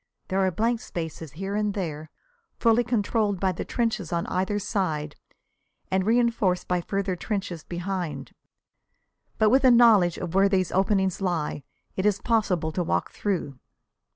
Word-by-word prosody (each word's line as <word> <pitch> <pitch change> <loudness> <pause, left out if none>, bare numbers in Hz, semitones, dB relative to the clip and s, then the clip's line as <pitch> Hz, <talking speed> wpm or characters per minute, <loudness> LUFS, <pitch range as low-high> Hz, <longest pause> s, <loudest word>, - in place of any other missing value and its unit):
There 190 0 0
are 190 -1 +3
blank 225 +6 0
spaces 160 - -6
here 195 +5 -4
and 210 -1 0
there, 155 -5 -4 0.5
fully 230 0 +3
controlled 215 -3 0
by 190 0 +1
the 175 - -4
trenches 225 -8 -2
on 170 -1 -1
either 190 +3 -1
side, 165 -8 -2 0.8
and 190 0 +2
reënforced 230 -5 +2
by 180 -1 0
further 195 +1 -2
trenches 185 -4 -4
behind. 175 -1 -4 1.1
But 215 -1 +4
with 265 +2 +4
a 260 - +7
knowledge 225 -8 +5
of 175 -2 -5
where 195 +1 +4
these 185 -2 +1
openings 190 0 +1
lie 170 -6 -1 0.3
it 190 +2 +1
is 205 -2 +2
possible 190 -9 0
to 175 +3 -1
work 170 - -1
through. 170 -10 -3
190 Hz, 155 wpm, -26 LUFS, 175-210 Hz, 1.1 s, a